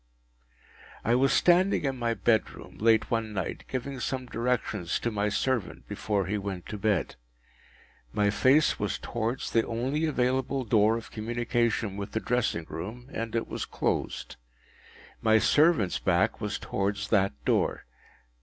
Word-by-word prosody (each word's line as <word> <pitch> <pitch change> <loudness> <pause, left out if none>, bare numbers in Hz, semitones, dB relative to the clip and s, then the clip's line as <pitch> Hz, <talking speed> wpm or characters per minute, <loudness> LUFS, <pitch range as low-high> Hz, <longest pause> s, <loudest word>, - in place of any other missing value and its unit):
I 115 - +3
was 135 +2 +3
standing 180 -1 +4
in 135 -1 0
my 120 -2 -1
bedroom 115 -2 -1
late 110 +2 +3
one 115 -2 -1
night, 95 -3 -4
giving 130 +1 -4
some 130 0 -2
directions 115 -7 -1
to 115 - -2
my 105 0 0
servant 120 +1 -1
before 100 -3 -1
he 105 +4 -1
went 95 -3 -5
to 105 - -4
bed. 100 -7 0 0.9
My 105 +6 +2
face 135 +8 +3
was 105 - -1
towards 120 +2 -3
the 115 - +3
only 130 +7 -1
available 130 -1 0
door 110 0 +3
of 115 - -9
communication 115 -2 -1
with 100 -1 -6
the 110 - +1
dressing 115 -9 0
room, 120 +9 -7
and 115 0 -4
it 115 - -1
was - - -4
closed. - - -2 0.8
My 110 0 +5
servant’s 145 - +3
back - - +1
was - - -2
towards 100 +1 -2
that 100 -5 +3
door. - - +1
115 Hz, 145 wpm, -28 LUFS, 105-125 Hz, 0.9 s, My